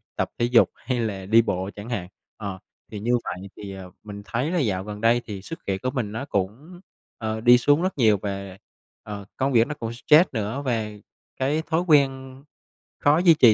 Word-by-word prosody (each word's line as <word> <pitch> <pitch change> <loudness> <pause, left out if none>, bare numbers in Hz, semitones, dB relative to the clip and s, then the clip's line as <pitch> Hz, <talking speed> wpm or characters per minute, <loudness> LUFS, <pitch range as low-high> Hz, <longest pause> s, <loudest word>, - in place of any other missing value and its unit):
tập - - -1
thể 120 - +3
dục 120 -1 +5
hay 125 -2 -3
là 100 -5 -3
đi 110 +4 +6
bộ 95 -4 -2
chẳng 105 +3 -8
hạn, 95 -7 -3 0.3
ờ, 100 -3 -5 0.3
thì 105 - -5
như 120 +4 +2
vậy 95 +2 -6
thì, 100 -1 -7
ờ, 95 -1 -9
mình 100 -1 -8
thấy 125 +9 -1
là 180 - +1
dạo 100 - 0
gần 105 0 -7
đây 115 +1 +4
thì 100 -3 -6
sức 165 +11 -8
khỏe 95 -1 -1
của 130 +5 -3
mình 125 -7 -2
nó 115 +5 -4
cũng, 140 - -4 0.4
ờ, 110 0 -3
đi 120 +1 +7
xuống 145 +5 +3
rất 185 -1 -1
nhiều 110 -5 +4
và, 100 -2 -5 0.5
ờ, 100 -2 -7
công 135 +1 0
việc 115 0 +5
nó 150 - -3
cũng 115 -5 -5
stress 150 +8 +5
nữa 110 +3 -3
và 115 -4 0 0.5
cái 140 +4 +1
thói 160 +1 0
quen 135 -5 +2 0.6
khó 145 +1 +4
duy 175 -1 +6
trì 125 -8 +6
115 Hz, 215 wpm, -24 LUFS, 105-135 Hz, 0.6 s, đi